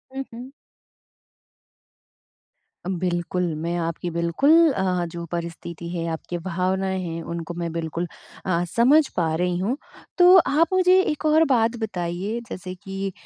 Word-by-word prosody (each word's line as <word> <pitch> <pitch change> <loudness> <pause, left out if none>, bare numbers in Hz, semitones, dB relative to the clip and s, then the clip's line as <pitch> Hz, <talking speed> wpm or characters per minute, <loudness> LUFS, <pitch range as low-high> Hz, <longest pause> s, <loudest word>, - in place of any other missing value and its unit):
हुँ, 270 - -2
हुँ। 245 +3 -9 2.4
बिल्कुल। 180 -1 -1 0.2
मैं 170 +1 -1
आपकी 170 +1 -3
बिल्कुल, 170 - +1 0.2
अ, 185 -4 0
जो 170 0 -6
परिस्थिति 170 0 -5
है 170 -1 -3
आपकी 165 +2 -4
भावनाएँ 190 +1 -1
हैं 165 -1 -4
उनको 170 +1 -5
मैं 170 -1 -4
बिल्कुल 165 +1 -3 0.4
अ, 175 -2 +1
समझ 265 - +4
पा 165 -3 +1
रही 180 +1 0
हूँ। 210 +9 -1 0.4
तो 360 0 +8
आप 325 -1 +4
मुझे 370 -1 +5
एक 305 -4 -2
और 310 +1 +5
बात 235 -4 +2
बताइए 190 +1 -3
जैसे 185 0 -6
कि 195 +1 -5
180 Hz, 135 wpm, -23 LUFS, 170-230 Hz, 2.4 s, तो